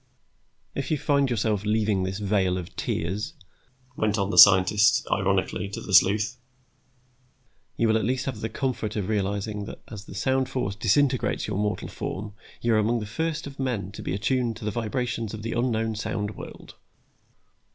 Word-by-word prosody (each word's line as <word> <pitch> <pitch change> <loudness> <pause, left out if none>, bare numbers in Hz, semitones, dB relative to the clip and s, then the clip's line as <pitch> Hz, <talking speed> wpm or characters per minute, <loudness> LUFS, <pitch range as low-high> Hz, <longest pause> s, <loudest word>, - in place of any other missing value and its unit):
"If 140 - -3
you 155 - +1
find 140 -2 +2
yourself 110 -3 0
leaving 105 -2 +1
this 95 +1 -2
vale 95 -3 +1
of 90 -1 -7
tears," 100 - -2 0.6
went 110 -2 0
on 100 0 0
the - - -2
scientist, 105 +5 +7
ironically, 95 -1 0
to 100 - -5
the 100 - -6
sleuth, 105 +6 +4 1.4
"you 115 - +2
will 110 0 +4
at - - -3
least 125 +4 0
have 120 -5 -4
the 110 - -2
comfort 115 -3 -2
of 105 -2 -2
realizing 100 0 -1
that - - -9
as 105 -2 -8
the - - -10
sound 130 +6 +1
force 100 -7 -2
disintegrates 130 +6 +1
your 100 -2 -2
mortal 105 0 -1
form 105 +2 -5 0.3
you 115 -1 +2
are 110 - +4
among 115 +3 +1
the 105 - -4
first 160 +9 -2
of 140 -1 -9
men 115 -8 -2
to 105 - -9
be 90 - -2
attuned 115 +2 0
to 115 - -8
the 105 - 0
vibrations 115 -1 -2
of 105 - -8
the 115 - -3
unknown 115 -2 0
sound 110 -1 -3
world. - - -10
110 Hz, 180 wpm, -26 LUFS, 100-120 Hz, 1.4 s, scientist